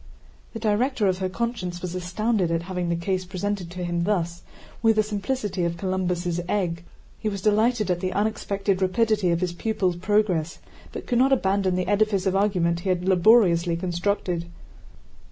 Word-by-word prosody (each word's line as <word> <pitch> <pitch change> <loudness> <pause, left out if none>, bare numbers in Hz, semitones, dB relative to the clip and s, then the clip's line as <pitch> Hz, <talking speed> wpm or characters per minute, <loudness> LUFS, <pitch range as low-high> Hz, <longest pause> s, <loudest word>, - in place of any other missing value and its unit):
The 225 - -5
director 225 +2 +1
of 185 -1 0
her 185 -1 -1
conscience 185 -5 -3
was 180 -1 -5
astounded 185 +2 0
at 165 0 -1
having 180 -1 -3
the 170 - +1
case 185 +2 -1
presented 190 0 -3
to 180 +1 -6
him 175 -1 -1
thus 175 -4 -1 0.4
with 225 -1 +4
the 215 - +3
simplicity 205 -2 -2
of 170 0 -1
Columbus' 180 -2 -1
egg. 170 -5 -1 0.4
He 215 - -1
was 200 -1 -4
delighted 215 -1 +2
at 175 - 0
the 185 0 -2
unexpected 200 -2 -1
rapidity 210 0 +2
of 170 0 +1
his 180 -1 -1
pupil's 185 -2 -1
progress, 185 -4 +1 0.3
but - - -7
could 240 -2 +1
not 265 +2 +4
abandon 195 -6 +2
the 180 -1 -1
edifice 205 -1 +2
of 190 0 +1
argument 180 -4 +1
he 190 - -3
had 180 0 0
laboriously 180 -3 +4
constructed. 175 -1 -2
185 Hz, 170 wpm, -24 LUFS, 175-210 Hz, 0.4 s, with